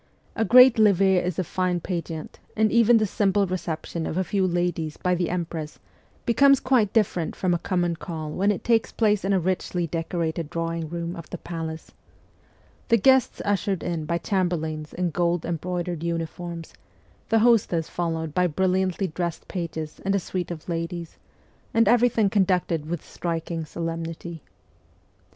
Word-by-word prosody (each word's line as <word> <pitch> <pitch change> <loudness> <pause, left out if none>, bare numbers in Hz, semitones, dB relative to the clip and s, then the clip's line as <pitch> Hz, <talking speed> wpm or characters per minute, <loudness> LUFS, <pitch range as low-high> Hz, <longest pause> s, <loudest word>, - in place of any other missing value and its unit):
A 225 - +1
great 250 +2 +7
levee 195 -3 +5
is 180 -2 -1
a 185 - +1
fine 180 0 -1
pageant, 165 -3 -5 0.2
and 220 0 +3
even 235 0 +5
the 215 - +2
simple 200 0 +1
reception 170 -2 -4
of 160 - -3
a 190 - +2
few 190 +1 0
ladies 175 -3 -1
by 180 - 0
the 175 -1 0
empress 165 -3 -4 0.5
becomes 275 +3 +5
quite 245 -6 +2
different 190 -7 0
from 185 -2 0
a 170 - 0
common 175 -2 0
call 160 -2 -6
when 200 +5 +2
it 200 - -4
takes 230 -2 +2
place 210 -3 +2
in 195 - 0
a 195 - +3
richly 180 0 -1
decorated 165 -1 -3
drawing 165 -1 -3
room 170 +1 -4
of 165 -2 -9
the 180 - -5
palace 165 -2 -6 1.0
the 230 - +5
guests 265 +4 +3
ushered 200 -2 0 0.2
by 170 - +1
chamberlains 160 -5 -2
in 180 -1 -2
gold 175 0 0
embroidered 175 0 -3
uniforms, 170 0 -4 0.6
the 225 - +4
hostess 215 -8 +3
followed 165 -3 -3
by 180 +2 +3
brilliantly 185 +3 0
dressed 170 -1 -4
pages 160 -3 -5
and 195 +1 +1
a - - +2
suite 180 0 -4
of 165 -3 -7
ladies, 170 0 -4 0.6
and 230 0 +4
every 245 0 +5
thing 220 -3 +2
conducted 180 -6 +1
with 175 -2 -4
striking 165 -1 -4
solemnity. 165 0 -5
175 Hz, 160 wpm, -25 LUFS, 165-195 Hz, 1.0 s, great